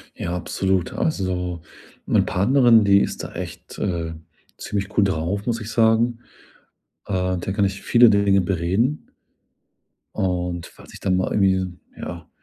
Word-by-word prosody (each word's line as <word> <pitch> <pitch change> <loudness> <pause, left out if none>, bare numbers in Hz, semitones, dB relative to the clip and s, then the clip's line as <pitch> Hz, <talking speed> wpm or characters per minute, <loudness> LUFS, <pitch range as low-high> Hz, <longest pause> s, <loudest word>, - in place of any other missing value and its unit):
Ja, 85 +1 -3
absolut. 95 +1 -1
Also, 90 - -2 0.4
meine - - +3
Partnerin, 115 +2 +4
die 100 0 +6
ist - - -3
da - - -8
echt, - - -8
äh, 85 -4 -2 0.4
ziemlich 100 0 -4
cool 100 - +6
drauf, 95 +3 -1
muss 115 -2 -1
ich 110 - -6
sagen. 115 +1 +2 0.9
Äh, 95 -1 0
mit 85 - -5
der 95 - -2
kann 100 0 +2
ich 95 0 -3
viele 120 -1 +6
Dinge 100 -2 +3
bereden. 95 - -1 1.1
Und, 90 -2 -2
falls - - -16
ich - - -10
dann 95 -2 +1
mal 95 - -1
irgendwie, 95 -2 +2 0.3
ja, - - -7
95 Hz, 150 wpm, -22 LUFS, 90-110 Hz, 1.1 s, die